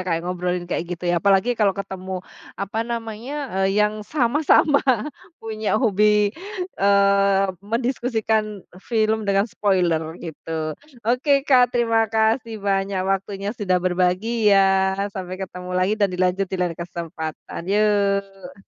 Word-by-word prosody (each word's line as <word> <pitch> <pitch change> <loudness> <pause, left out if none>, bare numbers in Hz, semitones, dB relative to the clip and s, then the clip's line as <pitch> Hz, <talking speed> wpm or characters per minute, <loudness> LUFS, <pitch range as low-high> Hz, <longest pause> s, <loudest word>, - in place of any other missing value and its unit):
Kak, 165 0 -1
ngobrolin 180 0 -2
kayak 175 -1 -3
gitu 180 - -11
ya 175 -1 +1
apalagi 200 +4 +3
kalau 205 -4 +1
ketemu, 190 -2 -6 0.3
apa 200 +3 -3
namanya, 230 +2 -5 0.4
eee, 195 - -1
yang 210 0 +1
sama-sama 285 +4 +3 0.6
punya 215 -1 -2
hobi, 210 -2 +3 0.5
eee, 200 0 +4 0.2
mendiskusikan 220 -2 -1 0.2
film 220 -1 0
dengan 195 0 +3
spoiler 185 -7 +1 0.2
gitu. 160 -1 -4 0.3
Oke, 270 +4 +2
Kak. 250 -3 +4
Terima 225 -2 +2
kasih 220 +2 +1
banyak 195 -1 -1
waktunya 195 +1 -2
sudah 205 -6 0
berbagi 185 +5 +1
ya. 195 -1 +4 0.2
Sampai 185 -1 -6
ketemu 180 -1 -7
lagi 185 +3 +2
dan 200 - +4
dilanjut 185 +1 0
di 190 - -3
lain 180 -1 0
kesempatan. 170 -2 -6
Yuk. 200 -2 0
200 Hz, 125 wpm, -22 LUFS, 185-220 Hz, 0.6 s, eee